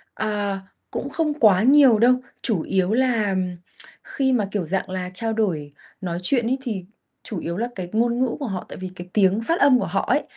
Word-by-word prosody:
À, 205 Hz, -2 st, -2 dB, 0.3 s
cũng -, -, -4 dB
không 310 Hz, -3 st, 0 dB
quá 205 Hz, -3 st, +5 dB
nhiều 265 Hz, -3 st, +6 dB
đâu. 245 Hz, +3 st, +5 dB, 0.3 s
Chủ 200 Hz, -10 st, +1 dB
yếu 190 Hz, +1 st, 0 dB
là 230 Hz, -5 st, +2 dB, 0.7 s
khi 265 Hz, -1 st, 0 dB
mà, 220 Hz, -5 st, +2 dB
kiểu, 195 Hz, -4 st, -2 dB
dạng 190 Hz, +3 st, -2 dB
là 185 Hz, -1 st, -4 dB
trao 225 Hz, +2 st, -1 dB
đổi 165 Hz, -10 st, -1 dB, 0.3 s
nói 175 Hz, -2 st, -3 dB
chuyện 240 Hz, +4 st, +2 dB
ấy, 260 Hz, +3 st, 0 dB
thì 210 Hz, -8 st, -4 dB, 0.4 s
chủ 205 Hz, -, -4 dB
yếu 170 Hz, +1 st, -4 dB
là 235 Hz, +3 st, -1 dB
cái 180 Hz, -2 st, -5 dB
ngôn 235 Hz, +2 st, +1 dB
ngữ 255 Hz, -2 st, 0 dB
của 275 Hz, -, -2 dB
họ, 190 Hz, -4 st, -4 dB
tại -, -, -9 dB
vì 185 Hz, -1 st, -5 dB
cái 175 Hz, -, -7 dB
tiếng 200 Hz, +1 st, +3 dB
phát 330 Hz, +9 st, -1 dB
âm 275 Hz, -3 st, +6 dB
của -, -, -2 dB
họ -, -, -1 dB
ấy, -, -, +3 dB
215 Hz, 215 wpm, -23 LUFS, 185-245 Hz, 0.7 s, nhiều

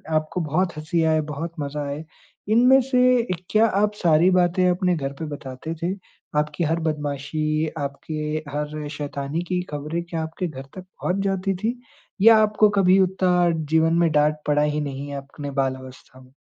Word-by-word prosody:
आपको 155 Hz, +3 st, -1 dB
बहुत 170 Hz, +4 st, 0 dB
हँसी 160 Hz, +2 st, -1 dB
आए, 155 Hz, -1 st, +3 dB
बहुत 155 Hz, +3 st, -5 dB
मज़ा 145 Hz, +1 st, -3 dB
आए, 145 Hz, +2 st, -5 dB, 0.5 s
इनमें 250 Hz, +4 st, +6 dB
से 250 Hz, -2 st, +3 dB, 0.3 s
क्या 215 Hz, +1 st, +4 dB
आप 210 Hz, +1 st, +1 dB
सारी 170 Hz, -1 st, +4 dB
बातें 180 Hz, 0 st, +3 dB
अपने 180 Hz, 0 st, +1 dB
घर 140 Hz, -2 st, -3 dB
पे 160 Hz, -, -3 dB
बताते 135 Hz, +4 st, -7 dB
थे? 180 Hz, +3 st, 0 dB, 0.5 s
आपकी 150 Hz, +3 st, -1 dB
हर 165 Hz, +1 st, 0 dB
बदमाशी, 155 Hz, +1 st, -1 dB
आपके 140 Hz, +2 st, -5 dB, 0.3 s
हर 150 Hz, +1 st, -4 dB
शैतानी 145 Hz, +2 st, -3 dB
की 180 Hz, -1 st, 0 dB
खबरें 150 Hz, +3 st, -3 dB
क्या 165 Hz, -2 st, -4 dB
आपके 165 Hz, +3 st, -4 dB
घर 135 Hz, -4 st, -8 dB
तक 185 Hz, -, -6 dB
पहुँच 185 Hz, -1 st, -4 dB
जाती 195 Hz, 0 st, 0 dB
थी? 230 Hz, +6 st, -3 dB, 0.4 s
या 225 Hz, +1 st, +8 dB
आपको 215 Hz, 0 st, +4 dB
कभी 190 Hz, +1 st, +5 dB
उतना 180 Hz, -2 st, +2 dB, 0.2 s
जीवन 160 Hz, +1 st, +3 dB
में 165 Hz, -, +3 dB
डाँट 150 Hz, 0 st, +2 dB
पड़ा 150 Hz, 0 st, +3 dB
ही 150 Hz, 0 st, 0 dB
नहीं 140 Hz, 0 st, -5 dB
है 140 Hz, -, -5 dB
अपने 140 Hz, +1 st, -7 dB
बाल 130 Hz, -1 st, 0 dB
अवस्था 130 Hz, 0 st, -13 dB
में? 130 Hz, 0 st, -19 dB
160 Hz, 175 wpm, -23 LUFS, 150-185 Hz, 0.5 s, या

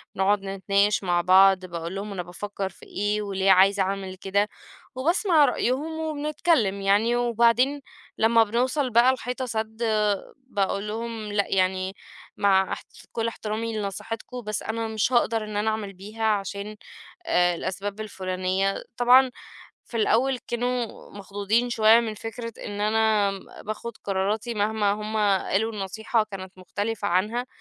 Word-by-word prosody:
بنقعد 195 Hz, +1 st, +2 dB
نتناقش 195 Hz, +1 st, +1 dB
مع 175 Hz, -2 st, +2 dB
بعض، 190 Hz, +1 st, +5 dB
باقول 170 Hz, +1 st, -5 dB
لهم 200 Hz, +1 st, -5 dB
أنا 180 Hz, -3 st, -4 dB
بافكر 195 Hz, +2 st, -5 dB
في 175 Hz, -, -16 dB
إيه، 205 Hz, +1 st, -1 dB
وليه 195 Hz, -1 st, +1 dB
عايزة 195 Hz, +1 st, +5 dB
أعمل 190 Hz, -1 st, -3 dB
كده، 200 Hz, +2 st, 0 dB, 0.5 s
وباسمع 325 Hz, +2 st, +3 dB
رأيهم 285 Hz, +5 st, -1 dB
وبنتكلم 300 Hz, -, 0 dB
يعني، 205 Hz, +5 st, +3 dB
وبعدين 240 Hz, +4 st, +2 dB, 0.4 s
لما 225 Hz, +1 st, +5 dB
بنوصل 255 Hz, +5 st, 0 dB
بقى 240 Hz, +2 st, +5 dB
لحيطة 255 Hz, 0 st, -4 dB
سد، 220 Hz, 0 st, -4 dB
آآ، 210 Hz, -3 st, 0 dB
باقول 205 Hz, -5 st, -2 dB
لهم: 225 Hz, -1 st, -4 dB
"لأ، 205 Hz, -1 st, +1 dB
يعني 185 Hz, 0 st, 0 dB, 0.4 s
مع 195 Hz, -2 st, +3 dB
احـت -, -, -8 dB, 0.2 s
كل 230 Hz, 0 st, -1 dB
احترامي 225 Hz, 0 st, -3 dB
لنصيحتكم، 215 Hz, +4 st, -5 dB
بس 215 Hz, -2 st, -3 dB
أنا 225 Hz, 0 st, -2 dB
مش 220 Hz, +3 st, 0 dB
هاقدر 230 Hz, -2 st, +2 dB
إن 210 Hz, -1 st, -5 dB
أنا 215 Hz, +1 st, +1 dB
أعمل 210 Hz, -2 st, -3 dB
بيها 210 Hz, +4 st, -8 dB
عشان، 205 Hz, 0 st, -1 dB, 0.5 s
آآ، 175 Hz, -, +3 dB
الأسباب 200 Hz, +4 st, -4 dB
الفلانية." 190 Hz, -1 st, -2 dB
طبعًا 250 Hz, +1 st, +6 dB, 0.6 s
في 235 Hz, -, -6 dB
الأول 250 Hz, +4 st, +2 dB
كانوا 245 Hz, -1 st, -3 dB
مخضوضين 205 Hz, +4 st, -1 dB
شوية 225 Hz, 0 st, +6 dB
من 225 Hz, -2 st, -3 dB
فكرة 230 Hz, +2 st, -6 dB
إن 205 Hz, -1 st, -5 dB
أنا 215 Hz, -1 st, +2 dB, 0.3 s
باخد 220 Hz, +2 st, -6 dB
قراراتي 205 Hz, +4 st, -1 dB
مهما 210 Hz, -1 st, +1 dB
هُم 215 Hz, +1 st, -4 dB, 0.3 s
قالوا 220 Hz, +4 st, 0 dB
النصيحة 215 Hz, +3 st, -1 dB
كانت 190 Hz, -1 st, -8 dB
مختلفة 205 Hz, +3 st, -3 dB
عنها، 215 Hz, +8 st, 0 dB
210 Hz, 140 wpm, -25 LUFS, 195-230 Hz, 0.6 s, طبعًا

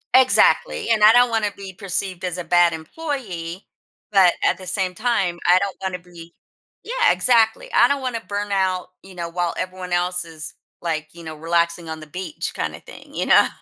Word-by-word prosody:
Exactly, 455 Hz, -, +4 dB
and 215 Hz, -2 st, +3 dB
I 215 Hz, -, +9 dB
don't 245 Hz, +1 st, +5 dB
wanna 220 Hz, -2 st, 0 dB
be 195 Hz, -1 st, -8 dB
perceived 185 Hz, -1 st, -3 dB
as 180 Hz, -1 st, -3 dB
a 180 Hz, -, -4 dB
bad 175 Hz, 0 st, +4 dB
employee, 185 Hz, -, -6 dB, 0.5 s
but 190 Hz, -4 st, +6 dB
at -, -, +2 dB
the 185 Hz, -, -10 dB
same 185 Hz, 0 st, -1 dB
time, 195 Hz, -6 st, 0 dB
I 180 Hz, +1 st, +7 dB
don't 195 Hz, 0 st, -1 dB
wanna 190 Hz, -1 st, -3 dB
be 170 Hz, -1 st, -14 dB, 0.5 s
Yeah, -, -, +2 dB
exactly. 225 Hz, -3 st, +2 dB
I 240 Hz, -, +6 dB
don't 280 Hz, +1 st, -1 dB
wanna 250 Hz, -3 st, -3 dB
burn 205 Hz, -1 st, -4 dB
out, 185 Hz, -2 st, 0 dB
you 190 Hz, -1 st, -14 dB
know, 170 Hz, -1 st, -4 dB
while 175 Hz, 0 st, -2 dB
everyone 185 Hz, -1 st, -5 dB
else 180 Hz, 0 st, 0 dB
is, 160 Hz, -2 st, -8 dB, 0.3 s
like, 155 Hz, -2 st, -2 dB
you 170 Hz, -, -12 dB
know, 160 Hz, -1 st, -7 dB
relaxing 170 Hz, +1 st, 0 dB
on 160 Hz, 0 st, -6 dB
the 155 Hz, -, -11 dB
beach, 185 Hz, -, -5 dB
kinda -, -, -4 dB
thing, -, -, -14 dB
you -, -, -1 dB
know? -, -, +6 dB
185 Hz, 195 wpm, -21 LUFS, 170-220 Hz, 0.5 s, I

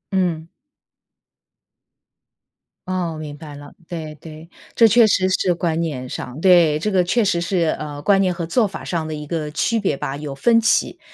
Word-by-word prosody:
嗯。 170 Hz, -4 st, 0 dB, 2.4 s
哦， 175 Hz, -4 st, -2 dB
明 150 Hz, -1 st, -7 dB
白 150 Hz, -2 st, -10 dB
了， 145 Hz, 0 st, -12 dB
对 160 Hz, -4 st, -6 dB
对。 160 Hz, +2 st, -12 dB, 0.3 s
这 230 Hz, -, +6 dB
确 230 Hz, +1 st, +6 dB
实 185 Hz, -2 st, +2 dB
是 185 Hz, -1 st, +1 dB
观 170 Hz, -2 st, -1 dB
念 135 Hz, -6 st, -3 dB
上 125 Hz, +3 st, -6 dB
对， 175 Hz, -5 st, +5 dB
这 210 Hz, +6 st, -2 dB
个 190 Hz, -2 st, +3 dB
确 230 Hz, +6 st, +2 dB
实 190 Hz, -4 st, +1 dB
是， 170 Hz, -2 st, 0 dB
呃， 145 Hz, -1 st, -6 dB
观 195 Hz, +6 st, +3 dB
念 185 Hz, -2 st, +2 dB
和 170 Hz, -1 st, -4 dB
做 205 Hz, +6 st, +1 dB
法 195 Hz, -, -8 dB
上 165 Hz, -3 st, -3 dB
的 155 Hz, -, -5 dB
一 150 Hz, 0 st, -7 dB
个 150 Hz, -1 st, -3 dB
区 225 Hz, +9 st, 0 dB
别 190 Hz, -8 st, 0 dB
吧， 135 Hz, 0 st, -4 dB
有 145 Hz, -2 st, -6 dB
分 230 Hz, +12 st, +3 dB
歧。 230 Hz, -, +1 dB
170 Hz, 195 characters per minute, -20 LUFS, 150-185 Hz, 2.4 s, 这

